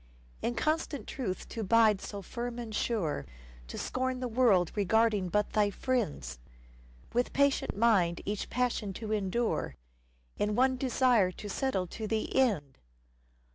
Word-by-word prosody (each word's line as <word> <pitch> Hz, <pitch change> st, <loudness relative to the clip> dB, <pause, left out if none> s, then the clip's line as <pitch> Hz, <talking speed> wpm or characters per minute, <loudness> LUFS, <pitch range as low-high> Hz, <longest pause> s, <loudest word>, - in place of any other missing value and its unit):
In 240 Hz, -, -1 dB
constant 310 Hz, -5 st, -1 dB
truth 210 Hz, -9 st, -4 dB
to 230 Hz, -, -4 dB
bide 215 Hz, -1 st, +4 dB
so 200 Hz, -2 st, -6 dB
firm 240 Hz, +4 st, -5 dB
and 230 Hz, -2 st, -6 dB
sure, 190 Hz, -, -1 dB, 0.4 s
To -, -, -7 dB
scorn 260 Hz, 0 st, -2 dB
the 255 Hz, -, -2 dB
world 220 Hz, -8 st, +3 dB
regarding 210 Hz, -1 st, +2 dB
but 210 Hz, +3 st, +1 dB
thy 210 Hz, -1 st, +3 dB
friends? 185 Hz, -, -2 dB, 0.7 s
With 245 Hz, +1 st, 0 dB
patient 280 Hz, -6 st, +2 dB
mind 195 Hz, -7 st, +3 dB
each 205 Hz, +1 st, -3 dB
passion 240 Hz, -5 st, -1 dB
to 215 Hz, +2 st, -6 dB
endure, 205 Hz, -, -1 dB, 0.6 s
In 210 Hz, 0 st, +1 dB
one 260 Hz, +2 st, +3 dB
desire 250 Hz, -6 st, +3 dB
to 210 Hz, -, -8 dB
settle 205 Hz, -3 st, -1 dB
to 215 Hz, +5 st, -6 dB
the 220 Hz, 0 st, -2 dB
end 195 Hz, -, +1 dB
220 Hz, 140 wpm, -30 LUFS, 195-250 Hz, 0.7 s, bide